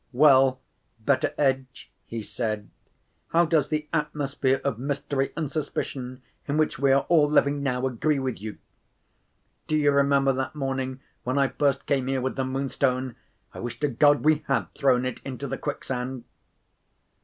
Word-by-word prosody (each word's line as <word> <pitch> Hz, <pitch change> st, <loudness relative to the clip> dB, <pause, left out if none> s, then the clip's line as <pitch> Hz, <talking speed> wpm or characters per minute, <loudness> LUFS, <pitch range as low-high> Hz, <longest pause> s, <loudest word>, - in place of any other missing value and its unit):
"Well, 135 Hz, -1 st, +5 dB, 0.4 s
Betteredge," 130 Hz, +1 st, 0 dB, 0.2 s
he 115 Hz, -1 st, -5 dB
said, 110 Hz, -2 st, -3 dB, 0.6 s
"how 170 Hz, +1 st, +3 dB
does 155 Hz, -3 st, +2 dB
the 150 Hz, 0 st, -2 dB
atmosphere 145 Hz, -3 st, 0 dB
of 130 Hz, -5 st, -1 dB
mystery 140 Hz, 0 st, -1 dB
and 155 Hz, -4 st, -2 dB
suspicion 130 Hz, -4 st, -4 dB, 0.2 s
in 145 Hz, +1 st, 0 dB
which 155 Hz, 0 st, +1 dB
we 140 Hz, 0 st, +3 dB
are 135 Hz, 0 st, +3 dB
all 155 Hz, -4 st, +4 dB
living 145 Hz, -1 st, +3 dB
now, 130 Hz, -2 st, 0 dB
agree 130 Hz, +4 st, +1 dB
with 130 Hz, -6 st, -3 dB
you? 110 Hz, 0 st, -6 dB, 1.1 s
Do 155 Hz, -, +1 dB
you 145 Hz, -1 st, +4 dB
remember 140 Hz, -1 st, +3 dB
that 130 Hz, +3 st, -3 dB
morning 135 Hz, -2 st, -3 dB, 0.2 s
when 130 Hz, +3 st, -1 dB
I 140 Hz, -1 st, +3 dB
first 140 Hz, -2 st, 0 dB
came 135 Hz, -2 st, 0 dB
here 135 Hz, 0 st, 0 dB
with 130 Hz, +1 st, -2 dB
the 135 Hz, -, -1 dB
Moonstone? 130 Hz, -1 st, -1 dB, 0.4 s
I -, -, -8 dB
wish 120 Hz, -1 st, -5 dB
to 150 Hz, -, +2 dB
God 145 Hz, +4 st, +4 dB
we 155 Hz, -1 st, +4 dB
had 135 Hz, -, 0 dB
thrown 130 Hz, -2 st, +2 dB
it 130 Hz, -, -4 dB
into 135 Hz, 0 st, -5 dB
the 135 Hz, 0 st, -4 dB
quicksand!" 130 Hz, -3 st, -4 dB
135 Hz, 160 wpm, -26 LUFS, 130-145 Hz, 1.1 s, Well